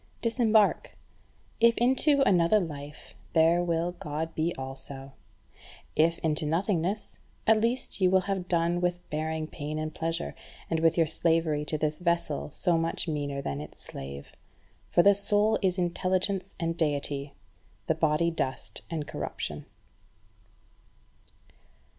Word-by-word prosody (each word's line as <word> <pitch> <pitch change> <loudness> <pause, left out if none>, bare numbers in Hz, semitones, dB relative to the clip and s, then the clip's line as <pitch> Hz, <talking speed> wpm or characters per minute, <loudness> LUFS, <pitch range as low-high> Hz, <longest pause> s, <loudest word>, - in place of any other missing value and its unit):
Disembark: 225 -3 +2 0.6
if 230 0 +5
into 265 +4 +3
another 180 +3 +4
life, 150 -4 -7 0.2
there 165 +1 +4
will 170 0 0
God 160 -1 -4
be 160 +2 0
also; 135 +1 -7 0.8
if 165 +2 +3
into 155 -1 +1
nothingness, 180 +5 -1 0.3
at 220 -1 +5
least 235 -2 -1
you 185 - +5
will 190 0 +4
have 190 -2 -3
done 170 0 +1
with 175 0 -1
bearing 155 +1 -2
pain 155 0 -5
and 155 0 -3
pleasure, 165 +1 -3 0.4
and 165 - +2
with 165 +1 +3
your 165 - +5
slavery 160 -1 +1
to 155 - -1
this 155 +1 -1
vessel 170 -5 0
so 170 +2 +1
much 165 +2 -2
meaner 145 -3 -2
than 70 0 -3
its 75 - -11
slave. 70 +1 -8 0.6
For 175 - +4
the 200 - +7
soul 210 +2 +2
is 185 -2 +1
intelligence 185 +2 0
and 165 -1 -1
deity, 145 -3 -1 0.5
the - - +2
body 160 +1 +2
dust 135 -5 -3
and 155 -3 -3
corruption. - - -5
165 Hz, 135 wpm, -28 LUFS, 155-185 Hz, 0.8 s, the